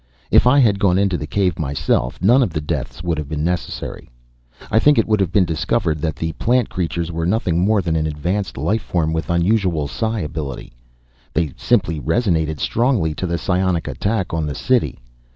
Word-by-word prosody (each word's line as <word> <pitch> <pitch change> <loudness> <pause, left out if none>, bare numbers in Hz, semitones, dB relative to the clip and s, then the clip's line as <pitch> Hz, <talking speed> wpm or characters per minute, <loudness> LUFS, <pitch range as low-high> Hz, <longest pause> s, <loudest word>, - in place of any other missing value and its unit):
If - - +5
I 135 +3 +5
had 110 -7 +4
gone 95 -3 +3
into 100 -2 +2
the 75 - -4
cave 95 -1 0
myself 70 -3 -1
none 120 +7 +5
of 120 - +1
the 75 - -1
deaths 75 +2 -4
would 85 -3 -1
have 75 -2 -6
been 75 -1 -2
necessary. 90 +1 -4 0.6
I 110 - +4
think 145 +5 +4
it 115 - +4
would 110 -1 +2
have 95 -4 0
been 95 -2 +3
discovered 80 0 -1
that 80 -1 -2
the 80 +2 -3
plant 125 -1 +2
creatures 85 -1 -2
were 85 0 -2
nothing 90 -4 +1
more 100 +2 +2
than 80 -1 -1
an 80 -1 0
advanced 90 +7 -3
life 110 +1 0
form 80 -3 -1
with 80 0 -3
unusual 85 -3 +1
psi 110 - -2
ability. 75 -5 -5 0.6
They 80 -5 0
simply 100 -10 +1
resonated 80 - 0
strongly 115 - +1
to 90 - -3
the 85 0 -1
psionic 90 -3 0
attack 100 -4 -2
on 80 -2 -1
the 75 - -4
city. 130 -2 +1
85 Hz, 195 wpm, -20 LUFS, 80-100 Hz, 0.6 s, If